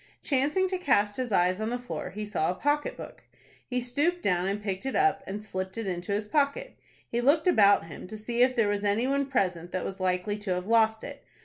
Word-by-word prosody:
Chancing 295 +7 +1
to 370 -1 -2
cast 210 - +2
his 255 -3 -3
eyes 185 +1 +2
on 220 - -1
the 245 - -1
floor, 245 0 -6
he 210 +2 -5
saw 185 -6 -1
a 180 - -1
pocket 295 - 0
book. - - -10 0.4
He 250 -1 -1
stooped 290 +9 -1
down 180 -1 +1
and 200 +1 -1
picked 195 -2 -4
it 265 - -3
up, 390 0 +3
and 205 +2 -5
slipped 190 -1 -4
it 225 - -3
into 180 0 -4
his 210 +1 -1
pocket. 290 - 0 0.3
He 235 - -1
looked 295 +5 +3
about 205 - +5
him 160 +2 -9
to 215 +3 -7
see 235 +3 -2
if 255 0 +4
there 230 -4 +3
was 205 0 -1
any 205 +4 +1
one 275 +1 0
present 180 -9 -1
that 185 - -2
was 195 - -5
likely 185 +3 -1
to 195 -3 -1
have 180 0 -4
lost 220 0 +3
it. - - -8
215 Hz, 235 wpm, -28 LUFS, 190-265 Hz, 0.4 s, about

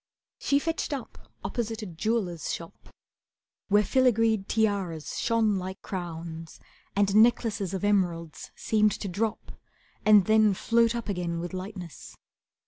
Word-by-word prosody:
She 280 - +2
fetched 325 +2 -2
up 270 -4 -8
opposite 225 -2 -3
a - - -4
jeweller's 180 -1 -2
shop, 165 0 -8 0.8
Where 205 +1 +4
filigreed 225 -5 +2
tiaras 200 -8 -1
shone 220 -4 +2
like 190 +1 -6
crowns, 165 -3 -6 0.4
And 200 0 +2
necklaces 215 -4 +3
of 190 - -4
emeralds 175 -6 0
seemed 215 -2 +2
to 205 - -5
drop 210 +4 -3 0.5
And 210 -3 +6
then 215 -2 +4
float 230 +3 +2
up 235 -1 -4
again 175 -4 -2
with 175 +2 -5
lightness. 185 - -8
205 Hz, 130 wpm, -27 LUFS, 175-225 Hz, 0.8 s, And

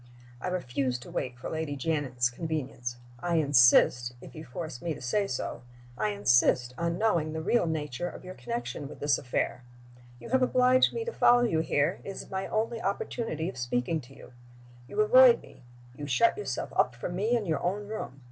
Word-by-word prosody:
I - - -3
refuse 135 -8 -1
to 120 - -12
wait 125 -1 -3
for 125 - -7
Lady 160 -2 -3
Janet's 135 -4 0
convenience. 130 -4 -4 0.2
I 175 +5 -1
insist 125 -4 +5
(if - - -12
you 155 - -8
force 140 -1 -7
me 165 -3 -2
to - - -10
say 195 +11 0
so) 130 - -4 0.3
I 105 -2 0
insist 120 +4 +3
on 170 +2 -1
knowing 170 -8 +1
the 160 - -3
real 235 -1 +2
nature 155 0 -3
of - - -11
your 185 - -7
connection 120 +1 -5
with - - -11
this 145 -3 +2
affair. 125 0 -2 0.6
You - - -10
have 260 +1 +2
obliged 255 0 +4
me 460 -1 -4
to 470 - -4
follow 245 0 +5
you 170 -9 +1
here; 155 +1 0
it - - -7
is 195 - -8
my 190 0 -3
only 225 +1 -1
opportunity 195 -4 -2
of 185 - -6
speaking 125 +6 -1
to 135 +1 -16
you. - - -14 0.5
You 210 - 0
avoid 250 +3 +7
me; - - -17 0.3
you 145 +2 -6
shut 150 - +3
yourself 200 -12 -4
up 125 -1 +2
from 175 +8 -5
me 220 +6 +1
in 220 - -3
your 160 -3 -1
own 200 +3 -2
room. 205 -11 -6
155 Hz, 195 wpm, -29 LUFS, 125-195 Hz, 0.6 s, avoid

